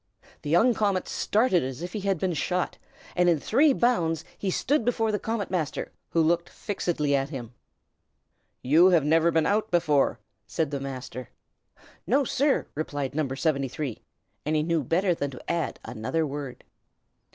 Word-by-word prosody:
The 145 - -5
young 220 +10 +5
comet 200 -4 0
started 215 -4 +2
as 130 +4 -5
if 180 - -6
he 215 - -2
had 195 -1 0
been 180 +2 -1
shot, 180 +3 -1 0.4
and 180 0 +4
in 165 -3 +3
three 280 - +4
bounds 170 - +1
he 195 - -3
stood 270 +8 +1
before 225 -2 +1
the 210 - -1
Comet 220 -2 -3
Master, 165 -6 -2 0.2
who 165 - +2
looked 170 +2 +1
fixedly 160 -8 -1
at 135 0 0
him. 125 -5 -7 1.1
"You 155 +8 +6
have 170 -6 +4
never 165 +2 +4
been 160 -2 +2
out 215 +1 +1
before," 150 -5 +2 0.3
said 160 -3 -1
the 140 - -2
Master. 130 -2 -6 0.8
"No, 275 +5 +3
sir!" 275 +2 +1
replied 145 -3 -3
No. 150 -1 0
73; 135 -3 -2 0.4
and 155 +1 0
he 150 - +2
knew 165 -2 0
better 180 +7 +2
than 145 -4 -2
to 130 +4 -6
add 170 -2 -2
another 130 +9 -2
word. 140 -3 -6
165 Hz, 165 wpm, -26 LUFS, 145-195 Hz, 1.1 s, You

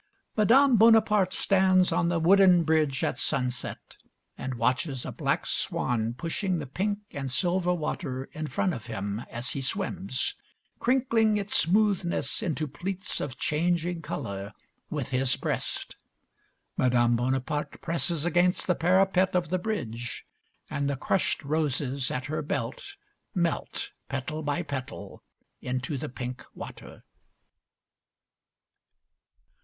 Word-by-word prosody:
Madame 245 +4 +5
Bonaparte 215 -3 +5
stands 185 -1 +3
on 170 - +2
the 175 - +1
wooden 180 0 +6
bridge 155 -4 +1
at - - 0
sunset, 125 -4 -2 0.4
and 130 -1 -4
watches 125 +3 0
a - - -4
black - - -1
swan 115 -1 0
pushing 175 +6 -1
the 150 - -4
pink 200 +10 -1
and 135 -2 -4
silver 180 +6 +1
water 150 -5 -2
in 155 0 -4
front 180 +4 0
of 115 -4 -7
him 105 0 -3
as 120 +2 -4
he 140 - -3
swims, 185 -2 -1 0.5
crinkling 235 -4 +3
its 205 0 -2
smoothness 185 -5 +2
into 155 - -1
pleats 185 +7 -3
of 130 -3 -4
changing 170 +2 0
colour 100 -9 -5 0.4
with 145 -5 -3
his 130 0 +2
breast. - - -2 0.8
Madame 120 -2 +3
Bonaparte 130 +4 -1
presses 165 -1 -1
against 175 +1 +3
the 180 - +3
parapet 185 +2 +3
of 175 -3 +1
the 185 - 0
bridge, 120 - -4 0.4
and 140 0 -1
the 140 - -1
crushed 185 +6 0
roses 140 -3 0
at 130 0 -3
her 155 +3 -2
belt 145 - -4 0.4
melt, 170 -2 -1 0.2
petal 135 +4 -3
by 150 +3 -1
petal, 140 -4 -6 0.4
into 130 +3 -2
the 135 - -4
pink 125 0 -6
water. - - -9
155 Hz, 125 wpm, -28 LUFS, 130-185 Hz, 0.8 s, wooden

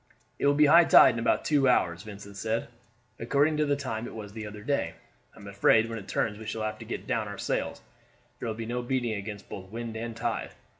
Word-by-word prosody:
"It - - +2
will 145 - +4
be 150 +1 +6
high 170 +3 +7
tide 130 - +8
in 115 - -3
about 115 - +1
two 140 -4 +3
hours," 85 -7 +2
Vincent 100 -1 -10
said, 110 +3 -2 0.5
"according 145 +6 +2
to 150 -1 +1
the 145 - +2
time 120 -5 -4
it - - -9
was 105 -2 -8
the 110 -1 -6
other 105 0 -9
day. 140 +4 -1 0.4
I - - -15
am 100 - -12
afraid 105 +3 +3
when 115 -1 -4
it 100 - -12
turns 105 -2 -1
we 110 - -8
shall 110 - -3
have 110 0 -3
to 115 - -9
get - - -5
down - - -1
our - - -7
sails; - - -2 0.6
there - - -4
will 110 - -2
be 115 0 -5
no 120 +2 -2
beating 120 -2 -1
against 100 0 -6
both 95 -1 -8
wind 115 +1 -6
and 115 0 -5
tide. 115 -1 -3
115 Hz, 245 wpm, -28 LUFS, 105-125 Hz, 0.6 s, tide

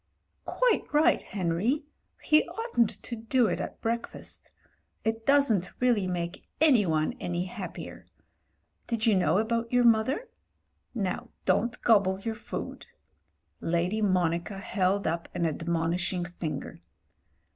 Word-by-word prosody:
*'Quite - - +1
right, 315 +3 +4
Henry. 195 - -1 0.4
He 305 0 +5
oughtn't 350 - 0
to 240 - -4
do 230 +2 +2
it 185 - 0
at - - -5
break 230 +1 -1
fast. - - -10 0.5
It 225 0 -2
doesn't 245 -10 +3
really 235 -6 +2
make 175 -1 -4
any 255 - +5
one 155 -1 +1
any 175 0 -2
happier. 185 -2 -8 0.8
Did 230 -2 -1
you 220 -3 +5
know 180 -2 +3
about 230 +2 0
your 245 0 +4
mother? 235 - +3 0.7
Now 195 -5 -2 0.2
don't 235 +3 +1
gobble 195 -4 +4
your 225 +3 -3
food." 220 - -7 0.7
Lady 175 +6 0
Monica 180 -1 +1
held 195 0 0
up 170 +1 -2
an 175 -1 0
admonishing 170 +2 -1
finger. 175 -3 -6
205 Hz, 125 wpm, -28 LUFS, 175-235 Hz, 0.8 s, He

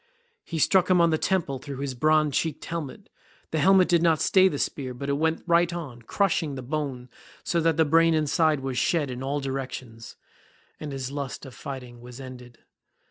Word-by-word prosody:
He 165 - -5
struck 180 +4 +3
him 185 -1 +5
on 170 -1 +4
the 155 - +1
temple 165 -9 0
through 140 +1 -7
his 140 -1 -3
bronze 155 +2 +2
cheeked 160 -3 -2
helmet. 170 +4 -6 0.4
The 160 - 0
helmet 190 +3 +5
did 170 -2 +3
not 165 -2 +3
stay 190 -1 +5
the 150 - -2
spear, 130 -3 -3
but 140 +3 -5
it - - +2
went 160 +3 0
right 170 0 +3
on, 145 -9 -7
crushing 160 - 0
the 130 - -6
bone 135 -2 -4 0.4
so 170 - 0
that 165 -1 +2
the 160 - +4
brain 165 +2 +4
inside 155 -1 +2
was 130 -2 -2
shed 150 -6 +1
in 125 0 -6
all 140 +2 -2
directions, 130 -4 -6 0.6
and 150 -2 -6
his 135 -1 -5
lust 140 -1 -5
of 130 - -10
fighting 125 -3 -8
was 125 +1 -11
ended. 125 -2 -10
145 Hz, 195 wpm, -26 LUFS, 130-165 Hz, 0.6 s, him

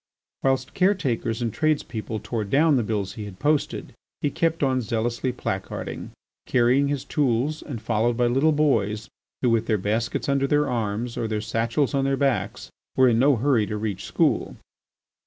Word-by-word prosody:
Whilst 130 -1 0
caretakers 135 - +1
and 115 -3 -2
tradespeople 115 -8 -1
tore 115 -3 -2
down 145 +8 +3
the 125 - +3
bills 105 -3 -2
he 105 - -6
had 100 -3 -9
posted, 150 +3 0 0.3
he 145 - 0
kept 165 -2 0
on 130 -2 +2
zealously 115 +3 -1
placarding, 95 -6 -4 0.4
carrying 130 +3 +3
his 140 -2 -2
tools 140 +2 0
and 130 -7 -6
followed 115 +2 0
by 125 - +3
little 135 +6 +3
boys 115 -7 +1 0.3
who, 125 - +4
with 115 0 +1
their 110 - +2
baskets 110 +4 -1
under 140 0 +2
their 145 +1 +2
arms 115 -1 -2
or 115 - -1
their 110 -1 -1
satchels 115 +6 0
on 135 -1 +1
their 135 0 +1
backs, 135 -3 -1 0.3
were 130 -1 +6
in 115 -1 +2
no 140 +2 +5
hurry 120 -3 +2
to 105 - -3
reach 105 -2 -3
school. - - +1
120 Hz, 175 wpm, -24 LUFS, 110-140 Hz, 0.4 s, were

